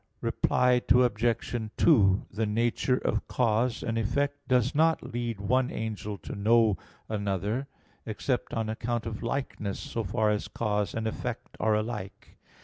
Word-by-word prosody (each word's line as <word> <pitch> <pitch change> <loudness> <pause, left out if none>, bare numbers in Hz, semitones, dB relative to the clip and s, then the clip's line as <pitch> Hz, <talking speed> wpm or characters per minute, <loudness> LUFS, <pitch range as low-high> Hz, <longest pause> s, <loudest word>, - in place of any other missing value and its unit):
Reply 125 -1 +2
Obj. 120 -2 +2
2: 100 - +5
The 110 +2 -1
nature 120 +4 +1
of - - -1
cause 115 0 +1
and 115 0 -1
effect 140 +5 -1
does 125 0 +2
not 160 -4 +2
lead 120 -3 -2
one 125 +6 +2
angel 105 -2 -4
to 90 - -8
know 110 +1 +4 0.3
another, 105 +4 -2 0.4
except 120 +4 -2
on 115 -1 -1
account 115 +1 -2
of 115 -2 -5
likeness, 115 -5 -3
so 115 - -3
far 110 +1 +1
as 105 - -1
cause 105 -2 -1
and 110 0 -2
effect 110 - -4
are 110 -1 +3
alike. 105 -3 -5
115 Hz, 140 wpm, -28 LUFS, 105-125 Hz, 0.4 s, 2